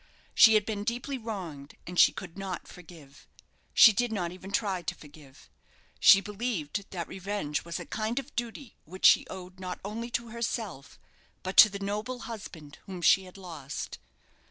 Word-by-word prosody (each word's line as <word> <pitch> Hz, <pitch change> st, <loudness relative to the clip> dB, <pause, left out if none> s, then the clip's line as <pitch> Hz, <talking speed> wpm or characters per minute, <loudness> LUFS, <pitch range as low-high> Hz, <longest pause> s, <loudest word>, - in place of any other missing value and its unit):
She 225 Hz, -2 st, +7 dB
had 210 Hz, -1 st, +3 dB
been 205 Hz, -2 st, -3 dB
deeply 245 Hz, +4 st, -3 dB
wronged, 175 Hz, -11 st, -7 dB
and 180 Hz, 0 st, -3 dB
she -, -, +8 dB
could 175 Hz, -3 st, -9 dB
not 190 Hz, -2 st, -6 dB
forgive. 160 Hz, -5 st, -15 dB, 0.4 s
She 220 Hz, -, +8 dB
did 245 Hz, +2 st, 0 dB
not 180 Hz, -6 st, -2 dB
even 185 Hz, +1 st, -10 dB
try 195 Hz, -3 st, 0 dB
to 170 Hz, -, -4 dB
forgive. 145 Hz, -2 st, -16 dB, 0.5 s
She 195 Hz, -, +8 dB
believed 200 Hz, -4 st, -4 dB
that 175 Hz, -3 st, -5 dB
revenge 190 Hz, -6 st, -3 dB
was 170 Hz, 0 st, -5 dB
a -, -, -7 dB
kind 220 Hz, +2 st, -3 dB
of 275 Hz, +1 st, -4 dB
duty 240 Hz, +2 st, -5 dB
which 185 Hz, +4 st, -5 dB
she -, -, +7 dB
owed, 185 Hz, 0 st, -10 dB
not 180 Hz, -1 st, -5 dB
only 230 Hz, +3 st, -5 dB
to 235 Hz, -1 st, -3 dB
herself, 220 Hz, -, -5 dB, 0.5 s
but 185 Hz, +1 st, -4 dB
to 215 Hz, -, +10 dB
the 200 Hz, -, -6 dB
noble 210 Hz, +6 st, -4 dB
husband 170 Hz, -10 st, -9 dB
whom 185 Hz, -3 st, -7 dB
she 190 Hz, +2 st, +5 dB
had 185 Hz, +1 st, -13 dB
lost. 155 Hz, -7 st, -7 dB
195 Hz, 175 wpm, -29 LUFS, 170-220 Hz, 0.5 s, to